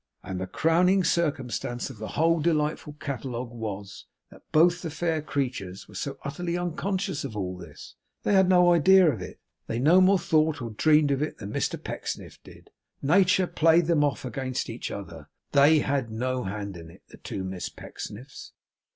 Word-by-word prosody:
And 95 -1 -5
the 95 - -3
crowning 180 - +3
circumstance 135 -7 -1
of 115 - -13
the 110 - -5
whole 165 +2 +3
delightful 150 -1 0
catalogue 125 -4 -5
was, 100 -4 -7 0.2
that - - -15
both 175 +3 +4
the 165 - -4
fair 160 0 -1
creatures 125 -11 -4
were 105 - -16
so 135 +7 -4
utterly 170 +4 -3
unconscious 180 0 -2
of 120 -6 -6
all 90 -2 -3
this! 85 -5 -12 0.3
They - - +1
had 190 -1 +5
no 180 -1 +6
idea 180 +1 +6
of 105 - -7
it. - - -9 0.3
They 115 - -2
no 160 +9 +5
more 190 +1 +5
thought 160 -3 +1
or 120 -2 -5
dreamed 150 +5 +3
of 140 0 0
it 150 - -3
than 100 -1 -7
Mr - - -1
Pecksniff - - -6
did. - - -16 0.3
Nature 185 +5 +4
played 165 0 +3
them 160 -3 +3
off 145 -2 -1
against 130 +1 -3
each - - -5
other; - - -8 0.2
THEY 145 +2 +5
had 135 -4 -1
no 125 +2 -2
hand 100 -1 -5
in 80 -1 -11
it, - - -17
the - - -14
two 95 - -6
Miss 95 -1 -5
Pecksniffs. 125 +7 -10
145 Hz, 180 wpm, -26 LUFS, 115-170 Hz, 0.3 s, no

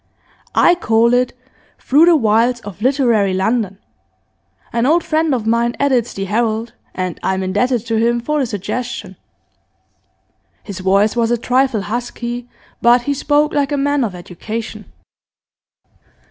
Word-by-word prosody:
I 350 - +5
call 235 -8 +2
it 250 0 +1 0.4
"Through 295 +5 +4
the 345 - +6
Wilds 235 -1 +2
of 205 -2 -10
Literary 235 -7 +2
London." 200 0 -1 1.0
An 235 +2 +1
old 330 +3 +3
friend 315 0 0
of 240 -5 -1
mine 235 +1 +1
edits 255 -4 +1
the 195 - -3
"Herald," 225 +2 -1 0.2
and 185 -2 -3
I'm 190 0 -1
indebted 225 +5 0
to 225 -1 -1
him 235 +1 +2
for 300 +5 -1
the 265 - 0
suggestion.' 210 -1 -5 1.5
His 200 -2 -7
voice 195 +4 +2
was 230 -1 +1
a 240 - +1
trifle 250 -1 +1
husky, 240 +2 -5 0.3
but 240 +1 +4
he 285 - -1
spoke 295 +2 +1
like 285 0 0
a 290 - 0
man 285 0 +1
of 205 -6 -3
education. 215 +6 -7
235 Hz, 145 wpm, -17 LUFS, 210-260 Hz, 1.5 s, the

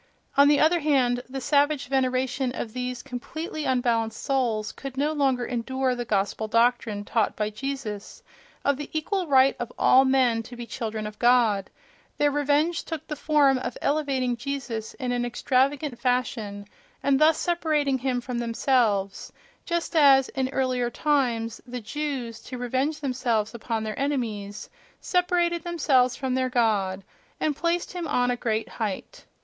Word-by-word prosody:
On 280 +1 +7
the 290 0 +5
other 335 +3 +4
hand, 260 -5 +2
the 270 +1 -4
savage 290 +1 +2
veneration 260 -1 0
of 225 -4 -5
these 250 0 -4
completely 305 +5 -5
unbalanced 230 -3 0
souls 240 -6 0
could 270 -1 -8
no 290 +3 +1
longer 270 -5 +1
endure 255 +2 -1
the 245 -1 -4
Gospel 205 0 -1
doctrine, 230 -2 +1
taught 220 -1 0
by 210 0 -2
Jesus, 225 -4 -6 0.4
of 280 -1 +2
the 295 - -6
equal 355 +4 -1
right 270 -1 +5
of 240 0 -4
all 260 - +6
men 260 -4 +3
to 245 +2 -11
be 240 0 -7
children 220 -2 -4
of 210 0 -8
God: 235 -5 +3 0.5
their 290 0 +3
revenge 290 +4 +1
took 320 -3 -6
the 300 - -5
form 290 -3 +3
of 255 - -5
elevating 275 -4 0
Jesus 245 -4 -4
in 255 -3 -3
an 245 0 0
extravagant 265 +2 0
fashion, 230 -5 -1 0.4
and 275 -1 +3
thus 310 0 +5
separating 305 -6 0
him 250 -1 -1
from 245 -1 -4
themselves: 230 -4 0 0.3
just 340 0 -2
as, 275 -4 +6
in 260 -1 -2
earlier 255 -2 0
times, 240 -6 0
the 250 0 -5
Jews, 255 -1 -4
to 255 - -6
revenge 260 +5 -1
themselves 240 -5 -1
upon 225 -1 -3
their 215 -1 -4
enemies, 225 -8 -3 0.3
separated 350 -1 +1
themselves 275 -8 +2
from 265 -2 -2
their 255 0 +1
God, 205 -6 +1 0.4
and 300 -2 0
placed 340 +3 -1
him 350 -2 -4
on 245 -3 +1
a - - 0
great 225 -2 -1
height. 215 -4 -5
255 Hz, 155 wpm, -25 LUFS, 235-285 Hz, 0.5 s, On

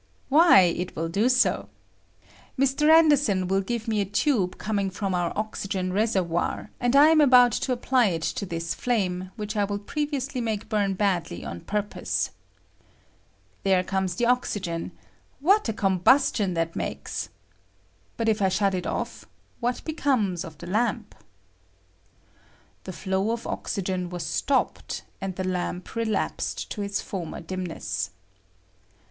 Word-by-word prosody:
"Why, 310 - +7
it 180 0 0
will 165 +1 -2
do 205 +8 +2
so. 250 -1 +2 0.9
Mr. 275 +3 +2
Anderson 290 - +5
will 195 +1 +2
give 235 +3 -4
me 215 -2 +1
a - - 0
tube 205 -1 0
coming 200 -2 -1
from 195 0 -3
our 175 -1 0
oxygen 195 -3 -2
reservoir, 190 -4 0
and 245 +2 +1
I 290 +2 +8
am 320 -1 +5
about 250 -3 +7
to 255 - -1
apply 250 -1 +2
it 165 -4 -2
to 200 - -2
this 170 0 -3
flame, 185 -6 -1
which 210 -1 -5
I 205 - +2
will 200 0 -1
previously 280 +1 -3
make 220 -2 -3
bum 205 -3 +1
badly 180 - -1
on 85 +5 -6
purpose. 210 0 -2 1.3
There 190 -2 +3
comes 190 -1 -1
the 240 - +1
oxygen: 205 -9 -1 0.5
what 380 - +3
a - - +2
combustion 195 0 +3
that 165 0 -1
makes! - - -4 0.9
But 230 - -1
if 215 -1 +2
I 190 - +4
shut 195 +1 +1
it 180 -1 -2
oft^ - - -4 0.3
what 245 0 -2
becomes 255 - 0
of 160 -2 -10
the 170 - -9
lamp? 215 +3 -1 1.7
[The 185 - -6
flow 190 +4 -1
of 235 0 -2
oxygen 185 -3 -3
was 175 -2 -5
stopped, 275 +10 -1 0.2
and 190 -1 -3
the 185 0 -3
lamp 180 0 -3
relapsed 225 -2 -2
to 210 - -4
its 200 0 -2
former 180 -5 -5
dimness. 180 0 -4
200 Hz, 145 wpm, -26 LUFS, 185-240 Hz, 1.7 s, I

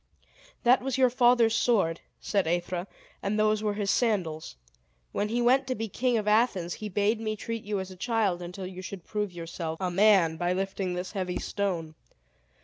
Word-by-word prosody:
"That 250 +2 +5
was 265 0 -2
your 255 -2 +4
father's 240 -2 +4
sword," 200 -9 +2 0.2
said 195 -5 0
Aethra, 175 +2 -1 0.3
"and 200 +2 -1
those 215 0 +2
were 210 -1 -1
his 200 -1 0
sandals. 175 - 0 0.6
When 210 - -1
he 240 +2 0
went 260 +2 +4
to 255 - -1
be 225 +1 -3
king 245 +4 +1
of 210 -1 -2
Athens, 210 -6 +2
he 210 - -4
bade 205 +3 +1
me 215 -1 -2
treat 230 +1 -5
you 205 -1 -2
as 190 0 -6
a - - -10
child 200 -3 0
until 180 +2 -6
you 185 0 -7
should 185 -1 -7
prove 210 -2 -2
yourself 165 -1 -5
a 185 -2 -1
man 190 -4 +4
by 175 +2 0
lifting 190 -1 -2
this 180 +1 -4
heavy 185 -3 -2
stone. 175 -6 -2
200 Hz, 190 wpm, -28 LUFS, 180-225 Hz, 0.6 s, That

